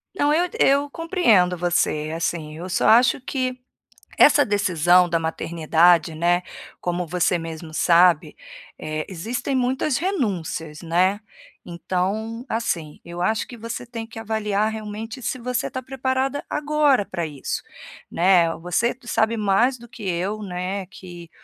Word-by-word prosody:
Não, 290 -4 +2
eu 350 +3 +2
eu 280 +1 +3
compreendo 275 - +2
você, 165 -3 0
assim, 165 -2 -3
eu 180 +3 -7
só 180 - +1
acho 240 +3 +5
que 255 -1 -3 0.6
essa 290 -1 +6
decisão 180 -3 +3
da 170 - +2
maternidade, 165 +1 +2
né, 175 +2 +1 0.4
como 175 0 -2
você 180 +1 +1
mesmo 165 -1 -8
sabe, 170 0 +4 0.4
eh, 155 0 -4
existem 225 +9 -3
muitas 260 +2 0
renúncias, 185 - -3
né. 180 +4 +1 0.5
Então, 200 +7 -3
assim, 170 -10 -3
eu 170 +1 -7
acho 220 +4 0
que 245 - -10
você 230 +1 -6
tem 230 -2 -6
que 225 0 -10
avaliar 215 -1 -1
realmente 220 +2 -6
se 255 +2 -3
você 250 0 -2
tá 260 - -4
preparada 265 +1 -2
agora 295 -6 +2
pra 170 -3 -4
isso, 145 -4 -5 0.5
né, 175 -2 +4
o - - -10
você 180 +9 0
sabe 230 -1 +1
mais 215 +5 +2
do 240 0 -14
que 235 -2 -12
eu, 190 +3 -2
né, 185 +1 -4
que 175 -3 -12
200 Hz, 145 wpm, -22 LUFS, 170-245 Hz, 0.6 s, essa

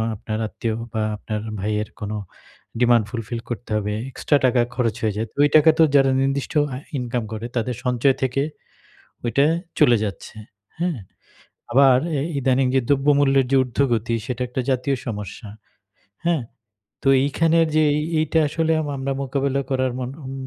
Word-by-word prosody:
আপনার 110 +1 -5
আত্মীয় 115 +1 -3 0.2
বা 110 - -1
আপনার 105 0 -5 0.2
ভাইয়ের 105 +2 -2
কোন 105 0 -4 0.7
ডিমান্ড 120 -2 +4
ফুলফিল 115 +1 -4
করতে 120 -1 -6
হবে। 105 0 -2 0.2
এক্সট্রা 145 - +1
টাকা 125 -1 +3
খরচ 115 -4 0
হয়ে 110 -2 0
যায়। 115 - -2
ওই 145 - +6
টাকা 155 +1 +7
তো - - +8
যারা 135 -1 +5
নির্দিষ্ট 135 0 -1 0.2
আ - - -4 0.2
ইনকাম 120 -2 -2
করে 110 +1 -5
তাদের 120 +1 -1
সঞ্চয় 125 +2 +2
থেকে 130 +1 0 0.8
ওইটা 140 +4 +2 0.3
চলে 120 - +6
যাচ্ছে। 100 0 -6 0.4
হ্যাঁ? 170 -6 -1 0.7
আবার 130 0 +6 0.2
এ - - -1 0.2
ইদানিং 130 0 +2
যে 130 - +4
দ্রব্যমূল্যের 140 -1 +3
যে 135 - +4
ঊর্ধ্বগতি 120 -3 0
সেটা 125 0 -4
একটা 125 +1 -3
জাতীয় 135 +1 +1
সমস্যা। 105 -1 -6 0.8
হ্যাঁ? 170 -6 +1 0.6
তো - - +1 0.2
এইখানের 165 +3 +2
যে 155 - +5 0.2
ই 150 - -2 0.2
ইটা 160 +2 +1
আসলে 160 +1 0
আম 150 - -3
আমরা 135 0 -2
মোকাবেলা 140 0 -1
করার 130 -1 0
মন 125 0 -4
ওম 130 - -6
130 Hz, 160 wpm, -22 LUFS, 115-140 Hz, 0.8 s, তো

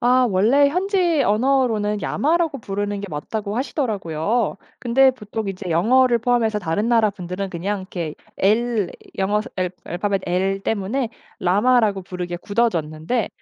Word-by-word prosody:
아 250 +1 +4
원래 235 +9 +4
"현지 360 -3 +1
언어로는 220 -3 +1
야마라고 320 -1 +1
부르는 205 -1 -3
게 205 - -5
맞다."고 205 +7 -4
하시더라고요. 215 - -1 0.2
근데 260 +2 +4
보통 210 -3 -5
이제 190 -1 -5
영어를 235 +8 +4
포함해서 230 -2 +1
다른 205 +4 -1
나라 225 -3 +4
분들은 185 0 -5
그냥 190 +4 -2
이렇게 170 -5 -5 0.2
L 220 0 +2 0.3
영어에서 205 +2 0
L 185 -1 0
알파벳 195 +2 -1
L 190 +2 0
때문에 225 +5 -1 0.3
라마라고 205 +2 +3
부르게 180 -1 -5
굳어졌는데 180 0 -1
210 Hz, 340 characters per minute, -21 LUFS, 190-245 Hz, 0.3 s, 아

